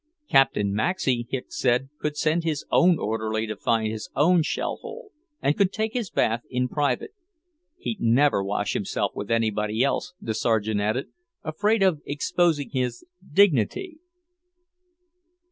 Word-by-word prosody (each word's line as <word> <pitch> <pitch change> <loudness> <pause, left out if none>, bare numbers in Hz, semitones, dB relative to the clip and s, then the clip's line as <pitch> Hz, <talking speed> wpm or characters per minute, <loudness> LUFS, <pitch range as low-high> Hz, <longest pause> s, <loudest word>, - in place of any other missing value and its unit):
Captain 105 -7 +3
Maxey, 120 - 0
Hicks 130 -2 -5
said, 125 +1 +2
could 150 -1 -3
send 160 +2 +1
his 155 -3 -2
own 175 -1 +5
orderly 110 -1 -2
to 110 -1 -4
find 110 +1 0
his 110 - -6
own 170 +3 +4
shell 155 - -2
hole, 470 -2 -9 0.3
and 145 - +2
could 200 -2 +2
take 220 +1 -2
his 235 -7 -2
bath 115 +2 +1
in 125 0 0
private. 140 - -1 0.7
"He'd 230 - -5
never 120 -1 +3
wash 105 +1 -1
himself - - -1
with 100 - -6
anybody 110 0 +1
else," 175 +6 -1
the 110 - -3
Sergeant 110 -2 0
added. 110 +6 -1 0.3
"Afraid 205 +7 +1
of 175 -6 +2
exposing 145 +1 0
his 130 - -2 0.3
dignity!" 200 - +2
135 Hz, 145 wpm, -25 LUFS, 110-175 Hz, 0.7 s, own